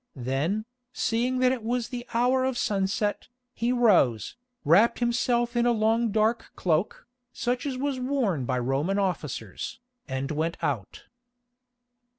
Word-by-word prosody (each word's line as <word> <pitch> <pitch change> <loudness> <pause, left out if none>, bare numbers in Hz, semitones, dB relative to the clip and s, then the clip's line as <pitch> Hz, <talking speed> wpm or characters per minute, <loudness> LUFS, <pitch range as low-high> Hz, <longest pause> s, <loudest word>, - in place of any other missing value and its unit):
Then, 140 - -1 0.3
seeing 245 +3 0
that 255 0 +5
it 260 -2 -2
was 235 +1 -2
the 240 -1 -6
hour 250 +2 +2
of 260 -1 0
sunset, 200 0 -1 0.3
he 235 +1 0
rose, 185 - +3 0.3
wrapped 190 +10 +5
himself 240 0 +1
in 240 0 +3
a - - +4
long 225 +1 +2
dark 220 +2 +1
cloak, 170 +2 0 0.3
such 245 +3 -2
as 265 -2 -3
was 275 0 -2
worn 250 - 0
by 130 +1 0
Roman 135 +10 0
officers, 160 - -3 0.3
and 135 +2 -3
went 160 +2 -1
out. 115 -9 -3
220 Hz, 140 wpm, -27 LUFS, 160-245 Hz, 0.3 s, that